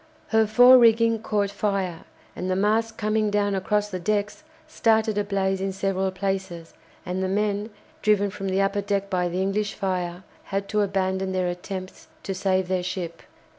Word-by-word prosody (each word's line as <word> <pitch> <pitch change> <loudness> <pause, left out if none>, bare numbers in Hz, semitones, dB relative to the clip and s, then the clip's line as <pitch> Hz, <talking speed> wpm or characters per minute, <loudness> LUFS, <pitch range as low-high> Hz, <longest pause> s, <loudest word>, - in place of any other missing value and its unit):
Her 220 -1 +3
fore 245 +4 +8
rigging 230 -1 +4
caught 205 -2 0
fire, 195 -4 -2 0.3
and 185 - -4
the 185 - +1
mast 220 +3 +1
coming 215 0 +1
down 205 0 +1
across 210 +2 0
the 185 - -3
decks 210 - -1 0.3
started 220 -6 +2
a 205 - +1
blaze 195 -1 -1
in 195 0 -1
several 190 0 -1
places, 190 -3 -4 0.3
and 180 +1 -3
the 190 - 0
men, 205 +2 -1 0.3
driven 205 -2 +2
from 195 0 -4
the 190 +1 +1
upper 195 +1 +1
deck 200 0 -2
by 180 -1 +1
the 180 +2 -1
English 205 +2 -1
fire, 180 -2 -3 0.2
had 195 0 -3
to 210 0 +1
abandon 190 -1 -1
their 185 -1 0
attempts 185 +1 -7 0.2
to 195 - -3
save 190 -1 0
their 185 0 0
ship. 180 -2 -5
195 Hz, 175 wpm, -24 LUFS, 185-210 Hz, 0.3 s, fore